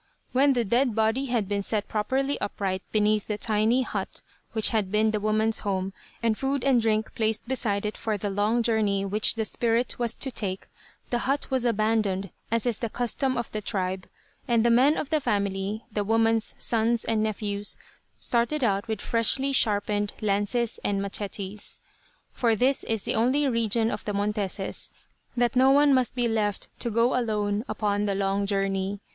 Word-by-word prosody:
When 275 Hz, +2 st, +4 dB
the 240 Hz, -2 st, 0 dB
dead 240 Hz, +2 st, +2 dB
body 225 Hz, +5 st, +1 dB
had 235 Hz, -6 st, -1 dB
been 200 Hz, 0 st, -1 dB
set 210 Hz, +1 st, -1 dB
properly 265 Hz, +6 st, -1 dB
upright 195 Hz, -2 st, -2 dB
beneath 210 Hz, -1 st, +2 dB
the 210 Hz, -, -2 dB
tiny 220 Hz, +4 st, +2 dB
hut -, -, -5 dB, 0.3 s
which 220 Hz, -2 st, +3 dB
had 210 Hz, -5 st, 0 dB
been 215 Hz, +1 st, +3 dB
the 215 Hz, -, -1 dB
woman's 215 Hz, +1 st, +1 dB
home, 190 Hz, -1 st, -2 dB, 0.3 s
and 225 Hz, -2 st, +2 dB
food 270 Hz, +2 st, -1 dB
and 260 Hz, -4 st, +4 dB
drink 220 Hz, -1 st, 0 dB
placed 220 Hz, 0 st, -1 dB
beside 215 Hz, -6 st, 0 dB
it 210 Hz, -, -3 dB
for 220 Hz, -2 st, -2 dB
the 205 Hz, 0 st, -3 dB
long 210 Hz, +4 st, +1 dB
journey 210 Hz, -4 st, +1 dB
which 210 Hz, +4 st, +2 dB
the 220 Hz, -1 st, -1 dB
spirit 235 Hz, +3 st, 0 dB
was 235 Hz, -2 st, 0 dB
to 265 Hz, -, -5 dB
take, 195 Hz, -5 st, -4 dB, 0.5 s
the 240 Hz, -, +1 dB
hut 280 Hz, 0 st, -1 dB
was 260 Hz, -2 st, +1 dB
abandoned, 215 Hz, -4 st, +1 dB, 0.2 s
as 230 Hz, +1 st, 0 dB
is 240 Hz, -4 st, 0 dB
the 230 Hz, -, -2 dB
custom 250 Hz, +3 st, 0 dB
of 235 Hz, -, -3 dB
the 215 Hz, -, -3 dB
tribe, 190 Hz, -2 st, -3 dB, 0.4 s
and 235 Hz, -1 st, +2 dB
the 235 Hz, -, +4 dB
men 265 Hz, +6 st, +5 dB
of 285 Hz, -, -4 dB
the 310 Hz, -, +3 dB
family, 200 Hz, -2 st, -2 dB
the 210 Hz, -1 st, -1 dB
woman's 225 Hz, +1 st, +1 dB
sons 230 Hz, 0 st, +1 dB
and 220 Hz, -1 st, +1 dB
nephews, 205 Hz, -1 st, -2 dB, 0.4 s
started 245 Hz, +5 st, 0 dB
out 200 Hz, -1 st, +1 dB
with 220 Hz, -2 st, -3 dB
freshly 250 Hz, +4 st, +1 dB
sharpened 205 Hz, -4 st, +1 dB
lances 210 Hz, +3 st, 0 dB
and 200 Hz, -1 st, 0 dB
"mechetes." 200 Hz, 0 st, -2 dB, 0.6 s
For 230 Hz, -3 st, +2 dB
this 260 Hz, +5 st, +2 dB
is 225 Hz, -3 st, -1 dB
the -, -, 0 dB
only 260 Hz, +6 st, +2 dB
religion 230 Hz, -2 st, +1 dB
of -, -, -4 dB
the 210 Hz, -, -2 dB
Monteses; 200 Hz, -1 st, -1 dB, 0.5 s
that 240 Hz, +1 st, +2 dB
no 260 Hz, +1 st, +5 dB
one 285 Hz, +1 st, +5 dB
must 255 Hz, -2 st, +1 dB
be 245 Hz, -2 st, +1 dB
left 210 Hz, -3 st, -1 dB
to 240 Hz, -, -2 dB
go 230 Hz, +3 st, +2 dB
alone 210 Hz, -3 st, 0 dB
upon 205 Hz, -1 st, 0 dB
the 200 Hz, -, 0 dB
long 195 Hz, 0 st, 0 dB
journey. 195 Hz, 0 st, -1 dB
220 Hz, 180 wpm, -26 LUFS, 205-240 Hz, 0.6 s, men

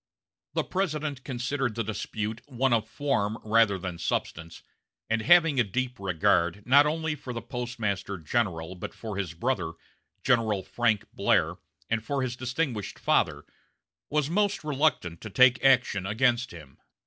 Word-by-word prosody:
The -, -, +2 dB
President 155 Hz, -7 st, -2 dB
considered 130 Hz, -2 st, -2 dB
the 115 Hz, -, -1 dB
dispute 110 Hz, +1 st, -4 dB
one 130 Hz, -1 st, +1 dB
of 110 Hz, -1 st, +1 dB
form 110 Hz, -4 st, -1 dB
rather 110 Hz, -2 st, +3 dB
than 90 Hz, -2 st, -6 dB
substance, 85 Hz, +1 st, -3 dB, 0.5 s
and 115 Hz, 0 st, +2 dB
having 165 Hz, -1 st, +5 dB
a -, -, +6 dB
deep 125 Hz, +4 st, -3 dB
regard, 90 Hz, +1 st, +1 dB
not 140 Hz, +4 st, +6 dB
only 160 Hz, 0 st, -1 dB
for 130 Hz, -4 st, -7 dB
the 115 Hz, -, -4 dB
Postmaster 110 Hz, -6 st, -3 dB
General, 85 Hz, -1 st, -1 dB
but 90 Hz, -, -7 dB
for 110 Hz, -3 st, -6 dB
his 95 Hz, -5 st, -3 dB
brother, 90 Hz, -5 st, -1 dB, 0.5 s
General 110 Hz, -6 st, +2 dB
Frank 115 Hz, -2 st, 0 dB
Blair, -, -, +2 dB, 0.3 s
and 115 Hz, 0 st, -1 dB
for 140 Hz, +2 st, -1 dB
his 120 Hz, -2 st, -2 dB
distinguished 130 Hz, -3 st, -3 dB
father, -, -, +1 dB, 0.6 s
was 150 Hz, -1 st, +1 dB
most 200 Hz, +3 st, 0 dB
reluctant 140 Hz, -, 0 dB
to 110 Hz, -, -7 dB
take 125 Hz, +4 st, +5 dB
action 125 Hz, -8 st, +3 dB
against 120 Hz, +3 st, +2 dB
him. 75 Hz, -6 st, -13 dB
120 Hz, 150 wpm, -27 LUFS, 100-135 Hz, 0.6 s, a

